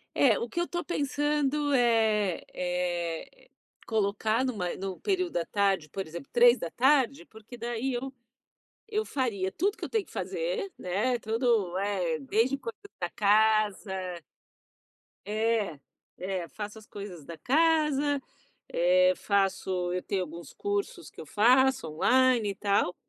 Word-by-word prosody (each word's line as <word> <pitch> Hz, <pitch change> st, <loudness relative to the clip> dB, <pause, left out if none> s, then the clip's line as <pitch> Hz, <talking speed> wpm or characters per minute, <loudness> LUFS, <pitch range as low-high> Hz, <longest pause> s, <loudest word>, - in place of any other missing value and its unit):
eh, 245 Hz, -7 st, +4 dB
o 235 Hz, -, -4 dB
que 345 Hz, -, -3 dB
eu 345 Hz, -, +1 dB
estou 345 Hz, 0 st, -4 dB
pensando 295 Hz, -1 st, 0 dB
é 220 Hz, -6 st, +2 dB
é 180 Hz, -, -3 dB, 0.4 s
colocar 215 Hz, +2 st, +1 dB
numa 205 Hz, -9 st, -2 dB
no 190 Hz, -1 st, -5 dB
período 370 Hz, -4 st, 0 dB
da 170 Hz, -, 0 dB
tarde, 195 Hz, -6 st, +1 dB
por 195 Hz, +2 st, -5 dB
exemplo, 155 Hz, -3 st, -9 dB
15h, 245 Hz, -, +4 dB
porque 220 Hz, +2 st, -13 dB
daí 240 Hz, +3 st, -2 dB
eu 260 Hz, +2 st, -3 dB, 0.8 s
eu 430 Hz, 0 st, -1 dB
faria 215 Hz, -9 st, -1 dB
tudo 395 Hz, -, 0 dB
que -, -, -6 dB
eu -, -, -4 dB
tenho 440 Hz, -3 st, 0 dB
que -, -, -19 dB
fazer, 485 Hz, -5 st, -3 dB
né, 210 Hz, +8 st, 0 dB
todo 220 Hz, -5 st, +1 dB
é, 185 Hz, -5 st, -1 dB
desde 225 Hz, -, +1 dB
cuidar 460 Hz, -, -7 dB, 0.2 s
da 175 Hz, -, -1 dB
casa 215 Hz, -1 st, +3 dB, 1.4 s
é, 215 Hz, -6 st, 0 dB, 0.4 s
é, 185 Hz, -2 st, -3 dB
faço 210 Hz, 0 st, -7 dB
as 215 Hz, -, -16 dB
coisas 200 Hz, -8 st, -9 dB
da 165 Hz, +1 st, -8 dB
casa, 295 Hz, -, +2 dB, 0.5 s
eh, 185 Hz, +1 st, +4 dB
faço 190 Hz, -3 st, 0 dB
eu 180 Hz, -, -1 dB
tenho 195 Hz, -2 st, -1 dB
alguns 170 Hz, -2 st, -9 dB
cursos 405 Hz, +4 st, -3 dB
que -, -, -16 dB
eu -, -, -9 dB
faço, 255 Hz, -2 st, +4 dB
online, 245 Hz, +7 st, +3 dB
e 200 Hz, -, -4 dB
tal, 200 Hz, -2 st, +1 dB
220 Hz, 140 wpm, -28 LUFS, 185-270 Hz, 1.4 s, eh